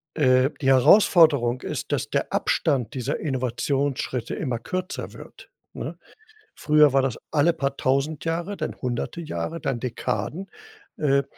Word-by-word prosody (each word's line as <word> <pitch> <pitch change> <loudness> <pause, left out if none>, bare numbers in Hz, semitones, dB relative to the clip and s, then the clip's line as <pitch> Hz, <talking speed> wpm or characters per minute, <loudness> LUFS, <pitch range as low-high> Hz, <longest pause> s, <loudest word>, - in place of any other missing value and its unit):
äh 130 -3 +4
die 135 - -1
Herausforderung 135 - +5
ist, - - -5
dass - - -1
der - - -1
Abstand 130 -8 0
dieser 130 +1 -3
Innovationsschritte 130 -1 -2
immer 125 -6 -3
kürzer 185 - -5
wird, - - -13 0.2
ne? - - -6 0.6
Früher 150 -1 +5
war 135 0 +3
das 130 -4 -1
alle 160 +3 +3
paar 140 -3 -2
1.000 140 +4 0
Jahre, 170 +5 -2
dann - - -4
hunderte 125 +7 -3
Jahre, 155 - -4
dann 130 -3 -2
Dekaden, 130 +9 -3 0.5
äh 140 -2 +2
140 Hz, 135 wpm, -24 LUFS, 130-155 Hz, 0.6 s, Herausforderung